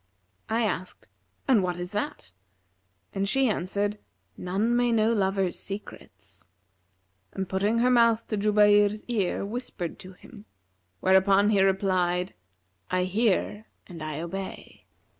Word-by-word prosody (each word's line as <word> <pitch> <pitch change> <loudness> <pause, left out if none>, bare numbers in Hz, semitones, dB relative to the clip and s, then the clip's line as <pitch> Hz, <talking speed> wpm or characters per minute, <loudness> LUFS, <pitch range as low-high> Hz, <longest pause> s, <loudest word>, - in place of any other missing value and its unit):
I 225 +1 +1
asked, 180 - -4 0.4
'And 250 -7 +4
what 180 -1 -2
is 175 +1 -5
that?'; 210 +8 -4 0.8
and 195 0 -1
she 270 +4 +3
answered, 205 +1 -1 0.4
'None 200 +6 -1
may 245 0 +2
know 225 0 +3
lovers' 195 -3 0
secrets,' 95 - -10 0.9
and 190 -1 -3
putting 200 +5 0
her 245 +2 +3
mouth 230 -2 +4
to 215 - -1
Jubayr's 205 0 +3
ear 205 -5 -1
whispered 205 -6 -5
to 185 +1 -11
him; 210 +3 -15 0.6
where 190 0 +4
upon 200 +2 +4
he 200 -2 +3
replied, 185 -2 +1 0.6
'I 185 0 +1
hear 210 +2 0 0.2
and 170 -4 -11
I 155 0 -4
obey.' 190 +3 -7
200 Hz, 130 wpm, -26 LUFS, 185-215 Hz, 0.9 s, And